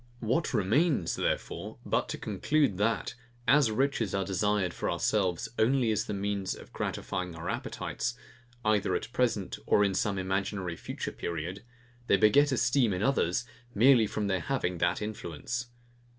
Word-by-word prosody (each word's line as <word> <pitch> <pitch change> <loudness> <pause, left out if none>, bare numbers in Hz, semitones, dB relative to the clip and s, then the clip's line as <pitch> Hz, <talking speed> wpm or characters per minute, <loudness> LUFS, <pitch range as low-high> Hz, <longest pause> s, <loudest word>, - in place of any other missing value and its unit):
What 125 +8 0
remains, 120 - +2
therefore, - - -2
but - - 0
to - - -3
conclude, 145 -11 0
that, 115 +3 0 0.3
as 140 -2 +5
riches 115 -3 0
are 95 -1 0
desired 100 -1 0
for - - -2
ourselves 90 0 0
only 120 0 +3
as 105 - 0
the - - -4
means 100 -1 -2
of - - -14
gratifying 90 -2 -3
our 80 - -6
appetites, - - -3 0.5
either 105 -4 +2
at 120 - -4
present 110 -7 0
or 105 - +5
in 100 -1 +2
some 100 +1 0
imaginary 95 -1 -2
future - - -5
period, 85 +5 -5 0.4
they 100 - +5
beget 140 +8 +5
esteem 120 -2 +2
in 90 +2 -2
others 120 -6 +1 0.3
merely 120 0 +6
from 105 +1 -2
their 95 -2 +1
having 90 -10 -2
that 85 +4 +1
influence. 110 +4 -4
105 Hz, 150 wpm, -30 LUFS, 95-120 Hz, 0.5 s, merely